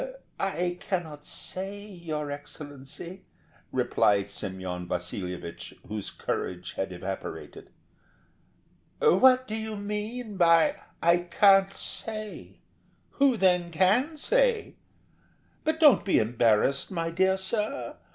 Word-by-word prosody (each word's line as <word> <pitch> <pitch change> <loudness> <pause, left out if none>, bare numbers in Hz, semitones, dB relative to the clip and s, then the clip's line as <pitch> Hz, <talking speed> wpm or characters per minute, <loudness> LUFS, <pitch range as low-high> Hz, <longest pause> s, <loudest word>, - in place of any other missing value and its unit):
"I 180 -2 -1
cannot 160 -7 -4
say, 195 +2 -1
your 160 -7 -5
Excellency," 145 +5 -8 0.5
replied 100 -1 +2
Semyon 95 -2 -4
Vasilyevich, 90 -1 -5
whose 105 0 -4
courage 90 0 -4
had 95 0 -3
evaporated. 95 +2 -7 1.3
"What 255 +6 +5
do 215 - -5
you 220 0 -3
mean 210 +2 -4
by? 165 -2 +5 0.3
"I 170 +1 +5
can't 195 +2 +4
say'? 215 -1 -5 0.6
Who, 275 -4 +4
then, 180 -3 +3
can 210 - +2
say? 485 +5 +1 0.9
But 315 0 0
don't 295 - +7
be 195 - +2
embarrassed, 115 +3 +2
my 165 -3 -2
dear 190 +2 +2
sir. 210 +7 -2
180 Hz, 105 wpm, -28 LUFS, 135-210 Hz, 1.3 s, don't